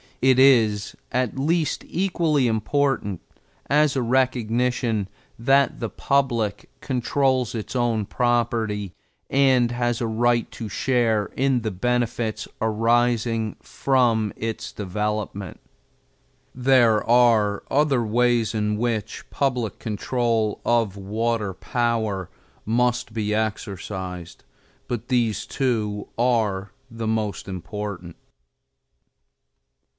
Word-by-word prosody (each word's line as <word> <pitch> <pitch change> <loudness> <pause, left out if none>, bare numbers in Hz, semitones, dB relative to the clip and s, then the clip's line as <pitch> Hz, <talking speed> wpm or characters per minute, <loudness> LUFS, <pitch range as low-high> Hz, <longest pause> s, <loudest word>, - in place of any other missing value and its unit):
It 130 0 +4
is 115 -6 +4 0.2
at 125 0 -1
least 160 +2 0
equally 165 -7 +1
important 110 - 0 0.5
as 150 0 +3
a 130 - +1
recognition 120 -3 +1 0.3
that 135 +4 +3
the 115 - -3
public 120 -2 0
controls 130 -1 0
its 110 +3 -5
own 115 -4 +1
property 115 -5 0 0.4
and 130 -3 +4
has 120 -1 -1
a - - +1
right 120 +1 +1
to 110 -3 -6
share 115 -2 +1
in 135 -2 +2
the 110 - -2
benefits 120 +2 -1
arising 115 0 +1
from 120 -6 +1
its 115 0 -4
development. 105 -1 -4 0.9
There 125 -4 +4
are 115 -4 +4
other 140 -4 +2
ways 120 0 +2
in 105 0 0
which 115 -2 -2
public 125 -6 -1
control 115 0 -1
of 115 -5 +1
water 105 +1 -1
power 110 -4 -1 0.4
must 120 +2 +1
be 105 -1 -1
exercised, 95 -5 -4 0.4
but 120 -1 -4
these 115 -5 0
two 110 -6 -1
are 110 -5 +1 0.2
the 115 -1 -4
most 110 -2 -2
important. 95 -1 -6
115 Hz, 100 wpm, -23 LUFS, 105-125 Hz, 0.9 s, It